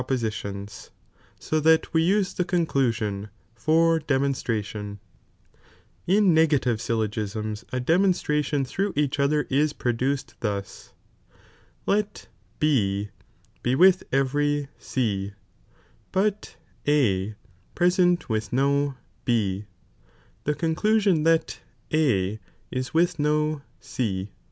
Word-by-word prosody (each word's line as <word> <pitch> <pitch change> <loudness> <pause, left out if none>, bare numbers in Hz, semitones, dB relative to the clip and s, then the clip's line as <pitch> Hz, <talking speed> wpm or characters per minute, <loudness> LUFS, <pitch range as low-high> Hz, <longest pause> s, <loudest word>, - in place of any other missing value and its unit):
'"'^''" 125 - -8
poiitions,]! 105 -5 -4 0.5
so 155 - -1
that 160 +1 +3
we 160 - +4
use 195 +3 +2
the 180 - 0
conclusion 120 - 0
' - - -38
for 165 +6 +3
de 145 -3 0
j 140 +1 +1
c"B'lLd'B 105 -4 -4 1.1
In 195 0 +4
negaiivD 145 -8 +3
syltogisnis 110 -1 -2
a 130 - -1
demonstration 150 -2 +1
through 195 +10 -2
e»ch 145 -1 0
other 145 0 +2
ia 145 +3 +3
produced 130 +3 -1
thus: 100 -3 -4 0.9
let 210 +1 -1 0.3
B 105 -9 +1 0.5
be 125 +1 +1
wilh 185 +4 +6
e^ery 145 +2 +1
J;^Jf^ - - -12
C, 100 -6 -2 0.8
hot 205 +2 0 0.3
A 110 -9 +2 0.4
present 175 -1 +3
with 110 -2 -2
no 140 +2 +1 0.3
B, 105 -4 0 0.8
the 150 - +1
conclusion 180 +2 +2
ihut 165 0 +2 0.4
A 110 -10 +2 0.3
ia 130 0 0
with 170 +1 +2
DO 150 0 +1 0.2
C. 105 -7 -3
140 Hz, 110 wpm, -25 LUFS, 110-160 Hz, 1.1 s, wilh